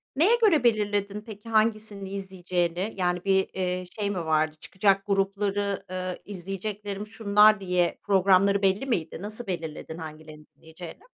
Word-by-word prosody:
Neye 365 Hz, -, +5 dB
göre 325 Hz, -, +5 dB
belirledin 205 Hz, -3 st, +1 dB
peki 215 Hz, 0 st, -11 dB
hangisini 215 Hz, -3 st, 0 dB
izleyeceğini? 185 Hz, 0 st, -2 dB
Yani, 180 Hz, -1 st, -1 dB
bir, 190 Hz, -1 st, +3 dB
eee, 185 Hz, -1 st, -2 dB, 0.2 s
şey 205 Hz, -1 st, 0 dB
mi 180 Hz, -4 st, -3 dB
vardı 155 Hz, 0 st, +1 dB
çıkacak 195 Hz, 0 st, +1 dB
grupları, 200 Hz, 0 st, -1 dB
eee, 185 Hz, -1 st, -4 dB
"İzleyeceklerim 200 Hz, +2 st, -5 dB
şunlar" 210 Hz, -1 st, +4 dB
diye 180 Hz, -2 st, 0 dB
programları 195 Hz, 0 st, +4 dB
belli 195 Hz, +5 st, +2 dB
miydi? 170 Hz, -13 st, -2 dB
Nasıl 215 Hz, +3 st, -6 dB
belirledin 160 Hz, -3 st, -5 dB
hangilerini 155 Hz, -1 st, -10 dB
izleyeceğini? 160 Hz, +2 st, -11 dB
195 Hz, 135 wpm, -26 LUFS, 180-210 Hz, 0.2 s, Neye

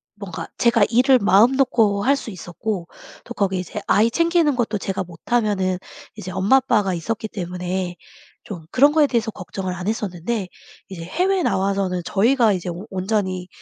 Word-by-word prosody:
뭔가 200 Hz, -4 st, -7 dB
제가 235 Hz, -3 st, +4 dB
일을 255 Hz, +3 st, +5 dB
마음 210 Hz, +5 st, +5 dB
놓고 220 Hz, -6 st, +2 dB
할 275 Hz, +2 st, +4 dB
수 235 Hz, -, -7 dB
있었고 180 Hz, 0 st, -5 dB, 0.4 s
또 240 Hz, -, -8 dB
거기 190 Hz, -4 st, 0 dB
이제 200 Hz, +3 st, -6 dB
아이 225 Hz, +2 st, +3 dB
챙기는 335 Hz, -2 st, +2 dB
것도 225 Hz, -3 st, -1 dB
제가 190 Hz, 0 st, -3 dB
못하면은 190 Hz, 0 st, -1 dB, 0.4 s
이제 185 Hz, -, -7 dB
엄마, 195 Hz, +9 st, +3 dB
아빠가 210 Hz, -7 st, +1 dB
있었기 220 Hz, +5 st, -3 dB
때문에 180 Hz, -1 st, -4 dB, 0.5 s
좀 175 Hz, -6 st, -8 dB
그런 285 Hz, +3 st, +5 dB
거에 300 Hz, -1 st, +4 dB
대해서 230 Hz, -4 st, -1 dB
걱정을 185 Hz, -1 st, -5 dB
안 180 Hz, +2 st, -6 dB
했었는데 205 Hz, -2 st, -3 dB, 0.4 s
이제 170 Hz, -3 st, -7 dB
해외에 365 Hz, -, 0 dB
나와서는 195 Hz, -, 0 dB
저희가 225 Hz, +1 st, +3 dB
이제 180 Hz, -1 st, -4 dB
오 175 Hz, +4 st, -6 dB
온전히 185 Hz, -1 st, -2 dB
200 Hz, 350 characters per minute, -21 LUFS, 185-235 Hz, 0.5 s, 일을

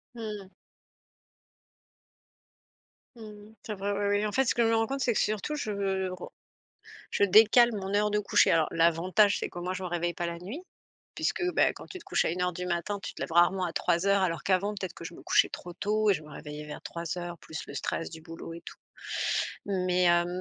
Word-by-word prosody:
Mmh 235 Hz, -, -8 dB, 0.2 s
mh. 190 Hz, -, -17 dB, 2.7 s
Mmh, 210 Hz, -1 st, -12 dB
c'est 215 Hz, -, -4 dB
vrai 200 Hz, +1 st, -2 dB
ouais 205 Hz, 0 st, -1 dB
oui, 205 Hz, +1 st, +2 dB
en 210 Hz, -, -3 dB
fait, 265 Hz, -, +3 dB
ce 235 Hz, -, +1 dB
que 240 Hz, -, +1 dB
je -, -, +3 dB
me 225 Hz, -, +3 dB
rends 225 Hz, 0 st, +2 dB
compte, 275 Hz, 0 st, -3 dB
c'est 245 Hz, -2 st, +2 dB
que -, -, +1 dB
surtout 215 Hz, +8 st, -1 dB
je 220 Hz, -7 st, -3 dB, 0.4 s
re 185 Hz, -, -8 dB, 0.8 s
je -, -, 0 dB
décale 220 Hz, +4 st, +7 dB
mon 195 Hz, -2 st, -4 dB
heure 210 Hz, +1 st, +3 dB
de 210 Hz, -, +1 dB
coucher. 205 Hz, -, +4 dB
Alors 160 Hz, -2 st, +4 dB
l'avantage, 175 Hz, +5 st, +3 dB
c'est -, -, -3 dB
qu'au 175 Hz, -, -7 dB
moins, 185 Hz, +1 st, -2 dB
je 185 Hz, -, -5 dB
me -, -, -2 dB
réveille 175 Hz, 0 st, -1 dB
pas 175 Hz, -, -3 dB
la 170 Hz, 0 st, -4 dB
nuit, 210 Hz, -, -6 dB, 0.6 s
puisque, -, -, -1 dB
bah, -, -, +3 dB
quand -, -, -11 dB
tu 375 Hz, -, -8 dB
te 335 Hz, -, -16 dB
couches -, -, +1 dB
à -, -, +1 dB
1:00 180 Hz, +1 st, -1 dB
du 180 Hz, +1 st, -5 dB
matin, 180 Hz, +3 st, -2 dB
tu -, -, -5 dB
te -, -, -12 dB
lèves -, -, -4 dB
rarement 175 Hz, +2 st, +4 dB
à 170 Hz, -, -3 dB
3:00, 190 Hz, +4 st, +2 dB
alors 165 Hz, -3 st, -1 dB
qu'avant, 195 Hz, +2 st, +2 dB
peut-être 190 Hz, -3 st, -5 dB
que -, -, -11 dB
je 165 Hz, -, -7 dB
me -, -, -12 dB
couchais -, -, +4 dB
trop 175 Hz, -, -8 dB
tôt 210 Hz, +4 st, +1 dB
et -, -, +5 dB
je 155 Hz, -, -5 dB
me 150 Hz, -, -13 dB
réveillais 150 Hz, 0 st, -8 dB
vers 150 Hz, -, -8 dB
3:00, 170 Hz, +1 st, -5 dB
plus 160 Hz, -, -8 dB
le 140 Hz, -, -9 dB
stress 165 Hz, -, -3 dB
du 160 Hz, -, -10 dB
boulot 165 Hz, 0 st, -9 dB
et 165 Hz, -, -8 dB
tout, -, -, -9 dB, 0.9 s
mais 185 Hz, -2 st, +1 dB
hem, 175 Hz, 0 st, +4 dB
185 Hz, 225 wpm, -29 LUFS, 170-210 Hz, 2.7 s, décale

